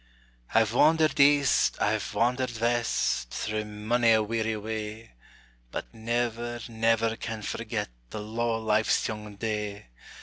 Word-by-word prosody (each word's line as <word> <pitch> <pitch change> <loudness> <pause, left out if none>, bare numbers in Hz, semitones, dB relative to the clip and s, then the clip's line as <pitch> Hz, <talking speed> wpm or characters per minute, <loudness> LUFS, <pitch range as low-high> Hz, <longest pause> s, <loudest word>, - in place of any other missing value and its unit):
I've 110 0 +4
wandered 155 +4 +4
east, 140 -1 +4
I've - - 0
wandered 125 -1 0
west, 115 - +1
Through 105 0 -3
mony 110 +3 +2
a 110 -1 +3
weary 110 0 -1
way; 110 +1 -5 0.6
But - - -6
never, 120 +1 -2
never 115 0 +1
can 110 -2 -5
forget - - -3 0.2
The - - -6
luve 110 +2 -6 0.2
o' - - -5
life's 110 0 +2
young 105 -1 -6
day! 105 - -4
110 Hz, 130 wpm, -28 LUFS, 105-120 Hz, 0.6 s, I've